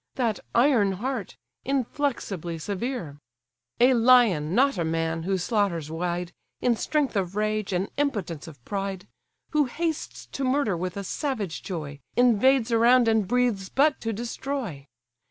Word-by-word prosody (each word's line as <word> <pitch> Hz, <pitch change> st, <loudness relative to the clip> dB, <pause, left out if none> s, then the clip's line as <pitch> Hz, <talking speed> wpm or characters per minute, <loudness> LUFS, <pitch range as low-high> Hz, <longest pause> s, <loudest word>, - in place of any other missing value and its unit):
That 235 Hz, -5 st, 0 dB, 0.2 s
iron 235 Hz, -6 st, +4 dB
heart, 230 Hz, +1 st, -4 dB, 0.3 s
inflexibly 245 Hz, -, -2 dB
severe; 185 Hz, -, -4 dB, 0.6 s
A 250 Hz, +2 st, +6 dB
lion, 225 Hz, -10 st, +4 dB
not 275 Hz, -5 st, +3 dB
a -, -, +1 dB
man, 165 Hz, 0 st, -1 dB
who 190 Hz, +3 st, 0 dB
slaughters 180 Hz, -5 st, 0 dB
wide, 175 Hz, +1 st, -3 dB, 0.3 s
In 245 Hz, -1 st, +2 dB
strength 285 Hz, +3 st, 0 dB
of 190 Hz, -1 st, -1 dB
rage, 215 Hz, -1 st, -1 dB
and 185 Hz, +1 st, 0 dB
impotence 205 Hz, -, -2 dB
of 140 Hz, -7 st, -13 dB
pride; 195 Hz, -2 st, -4 dB, 0.4 s
Who 300 Hz, -2 st, +3 dB
hastes 320 Hz, +5 st, -3 dB
to 275 Hz, -, -5 dB
murder 255 Hz, -6 st, +1 dB
with 180 Hz, +2 st, -4 dB
a 200 Hz, -, -3 dB
savage 215 Hz, -, -3 dB
joy, 150 Hz, -6 st, -6 dB, 0.2 s
Invades 245 Hz, +1 st, +4 dB
around, 235 Hz, +1 st, +5 dB
and 220 Hz, -3 st, +2 dB
breathes 235 Hz, -5 st, +1 dB
but 285 Hz, +1 st, +2 dB
to 225 Hz, -, -2 dB
destroy! 230 Hz, -, -4 dB
215 Hz, 140 wpm, -26 LUFS, 180-255 Hz, 0.6 s, A